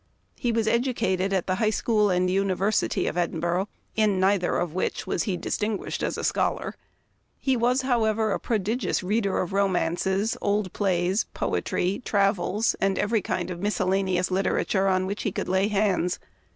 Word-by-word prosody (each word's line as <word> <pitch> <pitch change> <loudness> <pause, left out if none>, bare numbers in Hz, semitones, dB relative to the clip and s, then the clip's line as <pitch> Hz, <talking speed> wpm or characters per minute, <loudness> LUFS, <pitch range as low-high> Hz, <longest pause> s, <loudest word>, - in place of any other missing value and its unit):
He 240 - -1
was 225 -1 0
educated 225 -6 +1
at 190 -2 0
the 185 - 0
High 215 - +4
School 215 -1 +2
and 180 0 +2
University 195 +1 +1
of - - -2
Edinburgh, 175 +3 -1 0.3
in 210 -3 +2
neither 190 -1 +2
of 175 -3 -2
which 185 - -2
was - - -1
he 190 -4 -1
distinguished 210 +2 -2
as - - -1
a - - -4
scholar. - - 0 0.6
He 265 -1 +1
was, 250 +2 +2
however, 220 -4 +1
a - - 0
prodigious 220 0 -1
reader 200 +1 0
of 180 - -4
romances, 190 +2 +1
old 200 -2 0
plays, 185 +1 +1
poetry, 185 +5 -1
travels, 200 0 +1
and 195 -1 +2
every 220 +1 +1
kind 180 0 -2
of 175 - -5
miscellaneous 190 -2 0
literature 195 +1 +1
on 185 -1 +2
which 200 +2 -3
he 205 - -1
could - - -3
lay 190 +2 +2
hands. 195 -4 +1
195 Hz, 165 wpm, -26 LUFS, 185-215 Hz, 0.6 s, High